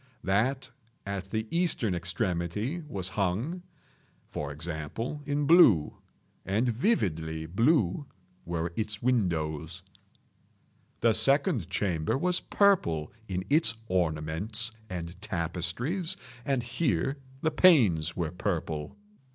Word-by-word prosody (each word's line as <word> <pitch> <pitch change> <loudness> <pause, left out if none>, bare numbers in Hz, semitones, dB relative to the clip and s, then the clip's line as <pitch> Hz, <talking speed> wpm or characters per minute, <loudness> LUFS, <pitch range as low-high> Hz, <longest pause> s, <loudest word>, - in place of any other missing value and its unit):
That 120 +8 +1 0.4
at 100 -1 -3
the 110 +1 -2
eastern 165 - +1
extremity 90 - -2
was 95 -8 -3
hung, 105 - -1 0.7
for 75 -1 -4
example, 85 - -5
in 145 0 0
blue—and 110 - +3
vividly 80 - 0
blue 115 - +2 0.4
were 85 0 -3
its 105 -1 -3
windows. 85 - 0 1.2
The 115 -1 +4
second 135 - +2
chamber 90 -1 0
was 180 +4 +2
purple 85 - +2
in 95 -1 -3
its 140 -7 +4
ornaments 90 +6 -1 0.2
and 90 0 -6
tapestries, 110 - -2 0.3
and 135 -3 0
here 135 +2 0 0.3
the 160 - +2
panes 110 - +5
were 85 -3 -1
purple. 85 - -3
100 Hz, 100 wpm, -29 LUFS, 85-135 Hz, 1.2 s, panes